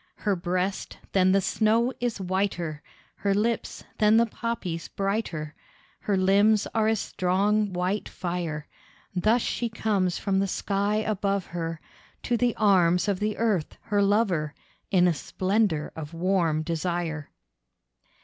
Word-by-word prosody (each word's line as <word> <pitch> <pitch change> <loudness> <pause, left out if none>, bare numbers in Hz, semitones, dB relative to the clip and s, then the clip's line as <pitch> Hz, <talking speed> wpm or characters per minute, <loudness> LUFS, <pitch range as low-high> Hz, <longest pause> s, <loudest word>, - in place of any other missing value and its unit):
Her 205 -2 0
breast, 180 +2 -2
than 185 -1 +4
the 195 +1 +4
snow 225 +6 +2
is 240 -3 -2
whiter, 180 -5 -2 0.4
Her 200 -1 +1
lips, 225 +2 -1 0.2
than 215 +1 +5
the 230 - +5
poppies 215 -7 -4
brighter, 195 -7 -2 0.5
Her 200 -2 0
limbs 200 +3 +4
are 220 -1 +2
as 220 -1 +2
strong 200 +4 +1
white 185 +3 -1
fire. 170 -4 -4 0.5
Thus 220 +6 +3
she 235 - -1
comes 200 -5 0
from 195 -1 0
the 195 - +1
sky 200 +2 0
above 200 -3 0
her 165 -2 -4 0.4
To 245 - +1
the 240 0 +1
arms 180 -4 +3
of 200 -2 0
the 210 0 -1
Earth 210 -9 0
her 205 -2 0
lover, 195 -7 +1 0.3
In 180 -2 +4
a 175 - +3
splendour 185 - 0
of 160 +1 -7
warm 170 -3 +1
desire. 165 -2 -2
195 Hz, 140 wpm, -26 LUFS, 175-215 Hz, 0.5 s, than